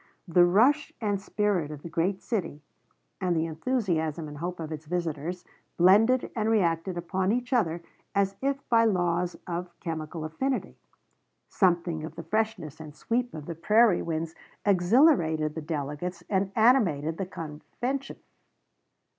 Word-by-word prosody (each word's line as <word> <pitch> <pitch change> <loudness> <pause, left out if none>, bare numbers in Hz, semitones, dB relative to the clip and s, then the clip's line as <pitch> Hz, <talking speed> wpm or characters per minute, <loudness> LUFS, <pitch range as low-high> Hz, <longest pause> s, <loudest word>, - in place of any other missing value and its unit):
The 175 +1 +5
rush 250 +12 +3
and 205 -3 -1
spirit 200 -7 0
of 150 -1 -8
the - - -6
great 170 +4 -1
city, 165 -9 -3 0.6
and 180 -2 +1
the 160 0 +1
enthusiasm 165 - -1
and 145 -1 -9
hope 175 +2 -4
of 160 -1 -5
its 155 0 -7
visitors, 170 +1 -3 0.3
blended 215 +8 +5
and 220 -1 0
reacted 175 -4 +1
upon 185 +2 -1
each 245 +3 -1
other 170 -8 +1 0.3
as 195 0 +2
if 275 +1 -2
by 230 -1 +4
laws 175 -4 +1
of 175 0 -5
chemical 160 -1 -5
affinity. 260 +13 -2 0.7
Something 170 -4 +1
of 160 - -7
the 165 - -7
freshness 195 -5 -2
and 155 -2 -10
sweep 245 +7 -1
of 150 -2 -7
the 170 - -4
prairie 210 +4 +4
winds 165 0 -3 0.3
exhilarated 175 - +4
the 160 - -5
delegates 150 +3 -4
and 195 0 +1
animated 180 - +3
the 190 - -2
convention. 200 - -5
175 Hz, 145 wpm, -27 LUFS, 160-215 Hz, 0.7 s, The